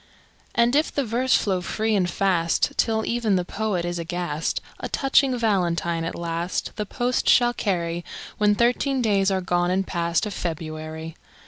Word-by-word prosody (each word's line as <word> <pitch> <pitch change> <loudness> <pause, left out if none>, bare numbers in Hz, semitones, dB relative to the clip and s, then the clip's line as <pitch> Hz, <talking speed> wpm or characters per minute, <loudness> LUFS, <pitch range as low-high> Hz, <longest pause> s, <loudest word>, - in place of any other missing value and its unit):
And 235 +2 +3
if 305 +2 +2
the 280 - -1
verse 245 +3 +2
flow 190 -3 +1
free 220 +4 -1
and 180 -3 +1
fast, 175 -2 +1
Till 220 -1 +1
even 230 -4 +1
the 180 -1 0
poet 200 -3 -2
is 175 0 -3
aghast, 170 -2 -2 0.2
A - - -5
touching 270 -1 +2
Valentine 175 -6 0
at - - -4
last 170 +1 -3
The 210 -2 -3
post 245 +3 0
shall 240 -1 +5
carry, 175 -6 -2 0.4
When 210 -1 +4
thirteen 250 +3 +1
days 200 -3 +3
are 190 -1 0
gone 175 -1 +1
and 190 +1 +1
past 170 +1 0
Of 210 - -4
February. 160 -1 -5
190 Hz, 165 wpm, -24 LUFS, 170-225 Hz, 0.4 s, shall